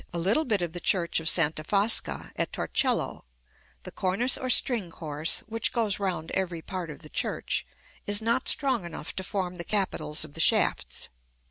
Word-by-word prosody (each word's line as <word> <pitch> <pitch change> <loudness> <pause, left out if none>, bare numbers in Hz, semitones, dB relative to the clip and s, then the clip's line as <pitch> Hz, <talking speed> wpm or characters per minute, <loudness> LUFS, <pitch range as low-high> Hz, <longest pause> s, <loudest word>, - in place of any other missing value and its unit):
a 175 - -3
little 200 - +2
bit 210 -7 +1
of 170 -2 -4
the 175 - -5
church 170 -2 +1
of 160 0 +2
Santa 155 -2 +2
Fosca 205 +6 +1
at - - -1
Torcello, - - 0 0.6
the - - -8
cornice 205 +7 +1
or 255 - -2
string 235 -7 +3
course, 155 -1 -1
which 225 +1 -1
goes 220 -5 0
round 180 -5 -3
every 175 -4 -2
part 185 -4 -6
of 150 +1 -10
the - - -10
church, - - -2 0.4
is 205 0 +3
not 230 +4 0
strong 265 -8 +3
enough 165 -3 -7
to 190 - -3
form 185 -2 -3
the 170 - -5
capitals 160 -6 0
of 150 - -15
the 165 - -8
shafts. - - +3
185 Hz, 185 wpm, -27 LUFS, 165-215 Hz, 0.6 s, string